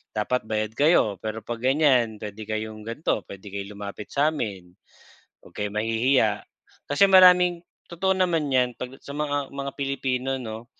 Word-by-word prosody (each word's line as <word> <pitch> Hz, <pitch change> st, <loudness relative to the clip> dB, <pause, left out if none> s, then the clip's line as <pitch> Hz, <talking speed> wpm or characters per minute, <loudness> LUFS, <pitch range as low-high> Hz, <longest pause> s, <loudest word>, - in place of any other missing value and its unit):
dapat 110 Hz, +2 st, -1 dB
bayad 110 Hz, 0 st, -1 dB
kayo, 140 Hz, -, +3 dB
pero 110 Hz, +1 st, -5 dB
'pag 120 Hz, +1 st, -5 dB
ganyan 130 Hz, -4 st, +3 dB
puwede 105 Hz, 0 st, -7 dB
kayong 110 Hz, 0 st, -4 dB
gan'to, 115 Hz, +8 st, -2 dB
puwede 100 Hz, +1 st, -11 dB
kayong 100 Hz, +1 st, -6 dB
lumapit 100 Hz, 0 st, -7 dB
sa'min, 115 Hz, -, -1 dB, 0.8 s
'wag -, -, -17 dB
kayong 105 Hz, 0 st, -4 dB
mahihiya." 115 Hz, -1 st, +2 dB, 0.5 s
Kasi 145 Hz, +8 st, +5 dB
maraming 180 Hz, -2 st, +6 dB, 0.2 s
totoo 190 Hz, +3 st, 0 dB
naman 165 Hz, -6 st, +1 dB
'yan 125 Hz, -2 st, +2 dB
'pag 125 Hz, +1 st, -7 dB
sa 140 Hz, -, -8 dB
mga 145 Hz, -2 st, -2 dB
mga 140 Hz, 0 st, -4 dB
Pilipino 135 Hz, -1 st, -2 dB
'no, 110 Hz, 0 st, -7 dB
125 Hz, 150 wpm, -25 LUFS, 110-145 Hz, 0.8 s, maraming